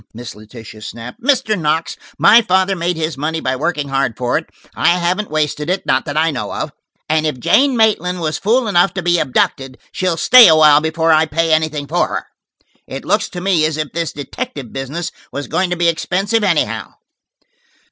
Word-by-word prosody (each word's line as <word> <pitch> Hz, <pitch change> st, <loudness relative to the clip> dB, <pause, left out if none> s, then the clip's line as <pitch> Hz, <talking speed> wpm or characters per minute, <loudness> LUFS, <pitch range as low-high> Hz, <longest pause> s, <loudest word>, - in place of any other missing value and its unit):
Miss 120 Hz, 0 st, -8 dB
Letitia 110 Hz, +1 st, -13 dB
snapped. 115 Hz, +3 st, -9 dB
"Mr. 255 Hz, -4 st, +1 dB
Knox, 160 Hz, -2 st, -1 dB, 0.2 s
my 230 Hz, +2 st, +6 dB
father 190 Hz, -1 st, +1 dB
made 175 Hz, -1 st, -2 dB
his 155 Hz, -3 st, -3 dB
money 160 Hz, +2 st, -2 dB
by 130 Hz, -3 st, -2 dB
working 145 Hz, 0 st, -2 dB
hard 135 Hz, -4 st, -1 dB
for 125 Hz, 0 st, -1 dB
it: 160 Hz, -, -3 dB, 0.2 s
I -, -, 0 dB
haven't 180 Hz, +4 st, -1 dB
wasted 150 Hz, 0 st, -2 dB
it–not 180 Hz, -8 st, 0 dB
that 145 Hz, -, -4 dB
I 160 Hz, +1 st, +2 dB
know 130 Hz, -, -5 dB
of. -, -, -4 dB, 0.4 s
And 155 Hz, 0 st, +1 dB
if 150 Hz, -5 st, -4 dB
Jane 265 Hz, -, +2 dB
Maitland 180 Hz, -5 st, +1 dB
was 155 Hz, -2 st, -2 dB
fool 230 Hz, +4 st, +1 dB
enough 180 Hz, -2 st, +2 dB
to 190 Hz, -, -3 dB
be 175 Hz, 0 st, +2 dB
abducted, 135 Hz, -1 st, -1 dB
she'll 185 Hz, -3 st, -1 dB
stay 245 Hz, +6 st, +8 dB
awhile 155 Hz, -2 st, +6 dB
before 160 Hz, +1 st, 0 dB
I 160 Hz, 0 st, +4 dB
pay 165 Hz, +2 st, 0 dB
anything 155 Hz, -2 st, 0 dB
for 165 Hz, +5 st, 0 dB
her. -, -, -5 dB, 0.6 s
It -, -, -7 dB
looks -, -, 0 dB
to 175 Hz, -, -7 dB
me 180 Hz, -4 st, +1 dB
as 155 Hz, 0 st, 0 dB
if 155 Hz, -2 st, -4 dB
this 165 Hz, 0 st, -2 dB
detective 140 Hz, -3 st, -7 dB
business 145 Hz, +6 st, -5 dB, 0.2 s
was 140 Hz, 0 st, -5 dB
going 185 Hz, -1 st, -1 dB
to 175 Hz, -, -2 dB
be 170 Hz, 0 st, +1 dB
expensive, 195 Hz, +6 st, 0 dB
anyhow." 175 Hz, -6 st, -1 dB
160 Hz, 190 wpm, -17 LUFS, 145-180 Hz, 0.6 s, stay